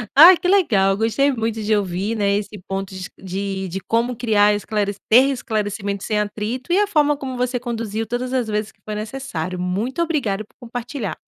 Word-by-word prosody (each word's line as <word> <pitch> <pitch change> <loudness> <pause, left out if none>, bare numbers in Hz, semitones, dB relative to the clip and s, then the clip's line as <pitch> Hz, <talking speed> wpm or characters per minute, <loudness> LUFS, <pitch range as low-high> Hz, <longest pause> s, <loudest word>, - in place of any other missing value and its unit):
Ai, 335 +5 +10
que 365 - -2
legal, 210 - +4
gostei 225 +6 +2
muito 225 -3 -2
de 215 +1 +2
ouvir, 200 +2 -1
né, 200 -2 +2
esse 205 -1 -6
ponto 195 0 -4
dis 185 -1 -6
de 190 0 -4
de 185 +2 -4
como 235 +5 0
criar 210 -3 +3
esclare 205 -1 -1 0.2
ter 255 +5 +7
esclarecimento 205 -5 -2
sem 210 -1 0
atrito, 215 +8 -3
e 360 - +4
a 415 - +4
forma 295 -5 +2
como 260 -2 -5
você 250 0 0
conduziu 225 -2 -3
todas 245 +3 -3
as 250 -3 0
vezes 210 0 -2
que - - -39
foi 215 - -4
necessário. 210 -7 -4
Muito 210 - -1
obrigado 235 -12 -1
por - - -34
compartilhar. 245 -1 -5
220 Hz, 190 wpm, -21 LUFS, 200-250 Hz, 0.2 s, Ai